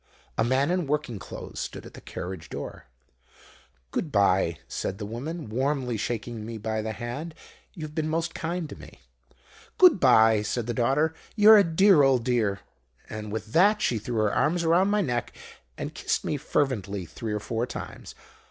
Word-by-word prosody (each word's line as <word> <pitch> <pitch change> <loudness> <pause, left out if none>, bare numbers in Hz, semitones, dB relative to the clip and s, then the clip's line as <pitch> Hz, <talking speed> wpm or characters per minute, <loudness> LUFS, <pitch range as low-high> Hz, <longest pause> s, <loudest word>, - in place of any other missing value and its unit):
"A - - +2
man 130 +6 +2
in 180 -4 0
working 145 -7 -2
clothes - - -8
stood - - -6
at - - -12
the - - -11
carriage 90 -3 -7
door. - - -7 1.1
"'Good 155 - -2
bye,' 95 -5 +3
said 95 - -4
the 105 - -5
woman, 135 +8 -5
warmly 130 +1 -1
shaking 115 0 -4
me 115 +1 -6
by 110 0 -2
the 110 0 -3
hand; 140 +9 -6 0.4
'you 165 - -7
have 150 -1 -7
been 155 0 -1
most 165 +1 -1
kind 170 0 -3
to - - -8
me.' - - -14 0.8
"'Good 360 - +7
bye,' 110 -5 +5
said 110 +2 -2
the 120 - -2
daughter; 135 +7 +2 0.2
'you're 215 0 +8
a - - +6
dear 180 0 +5
old 135 -3 +4
dear!' 110 -6 +1 0.5
"And 105 -1 -6
with 110 0 -5
that 205 +5 +5
she 120 - 0
threw 120 +3 -5
her 105 - +1
arms 170 +3 +1
round 175 +4 +4
my 210 0 +2
neck 120 -8 -2 0.4
and - - -5
kissed - - -2
me - - -1
fervently 110 -10 -1
three 110 +7 -6
or 105 - -1
four 115 +3 -2
times. - - -8
125 Hz, 180 wpm, -26 LUFS, 110-160 Hz, 1.1 s, you're